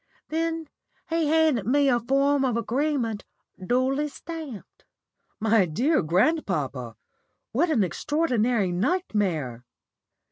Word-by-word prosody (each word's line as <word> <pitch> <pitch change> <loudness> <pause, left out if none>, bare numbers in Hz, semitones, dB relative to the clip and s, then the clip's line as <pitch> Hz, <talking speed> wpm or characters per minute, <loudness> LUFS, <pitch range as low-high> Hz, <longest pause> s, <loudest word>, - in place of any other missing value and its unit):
Then 325 0 -2 0.4
he 330 -2 +1
handed 305 -9 +2
me 280 +3 +3
a 245 -2 +3
form 275 +3 +2
of 250 -3 +1
agreement 240 -2 -1 0.4
duly 260 +7 +1
stamped." 300 - -9 0.6
"My 220 -3 +3
dear 255 - +1
grandpapa, 155 - 0 0.6
what 320 +9 +1
an 255 -10 +3
extraordinary 235 - 0
nightmare!" 180 - -1
250 Hz, 100 wpm, -25 LUFS, 200-305 Hz, 0.6 s, me